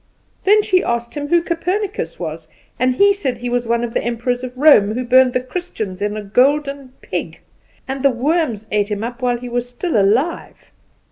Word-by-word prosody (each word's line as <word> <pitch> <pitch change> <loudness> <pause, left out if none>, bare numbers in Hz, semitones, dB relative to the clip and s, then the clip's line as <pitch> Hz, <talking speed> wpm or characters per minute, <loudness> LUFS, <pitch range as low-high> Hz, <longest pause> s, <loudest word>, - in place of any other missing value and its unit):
Then 420 +2 +5
she 370 -3 +2
asked 235 0 -2
him 290 -1 -4
who 345 +2 +3
Copernicus 355 - -2
was; 160 -1 -6 0.3
and 255 +1 +2
he 400 +7 +5
said 275 -11 -3
he 245 +1 -4
was 245 -1 -1
one 235 +1 +1
of 235 -1 -4
the - - 0
Emperors 240 +1 -2
of 255 0 -7
Rome, 240 -8 +5
who 250 +1 -2
burned 255 0 +5
the - - +2
Christians 250 - -5
in 210 +1 -1
a 210 - -5
golden 275 +4 +1
pig, - - -5 0.5
and 265 0 -4
the 275 - +5
worms 255 - -1
ate 205 0 +1
him 210 0 -3
up 240 +2 -6
while 245 -1 +1
he 245 +1 -8
was 245 0 -3
still 315 +6 -3
alive. 225 - 0
250 Hz, 200 wpm, -19 LUFS, 230-290 Hz, 0.5 s, Then